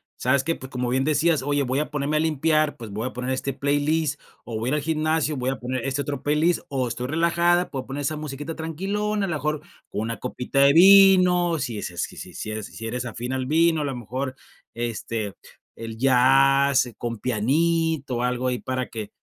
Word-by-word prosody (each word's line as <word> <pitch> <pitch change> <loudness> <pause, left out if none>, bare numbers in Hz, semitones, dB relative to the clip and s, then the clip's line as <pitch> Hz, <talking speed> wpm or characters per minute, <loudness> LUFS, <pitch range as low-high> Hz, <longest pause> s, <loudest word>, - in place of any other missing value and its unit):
¿Sabes 130 +2 +1
qué? 165 +3 0
Pu 130 -3 -9
como 125 -1 -2
bien 130 +2 +1
decías: 155 0 +2
"Oye, 145 +1 0
voy 130 +2 -1
a 150 - -2
ponerme 145 +1 -1
a - - +2
limpiar, 155 -1 +1
pues 115 -3 -9
voy 110 +5 -3
a - - -7
poner 125 +1 -3
este 135 +1 -2
playlist, 145 +2 0 0.2
o 110 -2 -4
voy 120 +3 -2
ir 150 - +1
al 150 - -1
gimnasio, 155 0 0
voy 130 +1 -1
a 135 - -1
poner 125 0 -3
este 135 +1 -1
otro 140 -2 -4
playlist, 155 +4 +1
o 130 -3 -1
estoy 125 +2 -4
relajada, 170 +3 +2
puedo 130 -2 -5
poner 140 +2 -4
esa 155 +2 -1
musiquita 150 +1 -6
tranquilona, 195 +6 -2
a - - -4
lo 170 - -2
mejor 150 +1 -2 0.3
con 105 - -3
una 115 +1 -3
copita 125 +2 -3
de 140 0 +7
vino". 180 -2 +6
Si 115 -6 -3
es - - -4
eh, 85 - -14
si - - -3
si - - -10
si 110 - -5
eres 110 -1 -5
si 115 - -9
eres 125 +2 -3
afín 120 +2 -5
al 130 -1 -2
vino, 160 +1 +3
a - - -1
lo 135 -2 -3
mejor, 130 +3 -4 0.4
este, 115 -3 -3 0.4
el 115 -1 -7
jazz, 135 +1 +4
eh, 120 - -10
con 120 -1 -4
pianito, 140 +3 0
algo 125 +1 -1
ahí 125 - -2
para 130 -1 -3
que 110 -3 -6
140 Hz, 220 wpm, -24 LUFS, 125-155 Hz, 0.4 s, de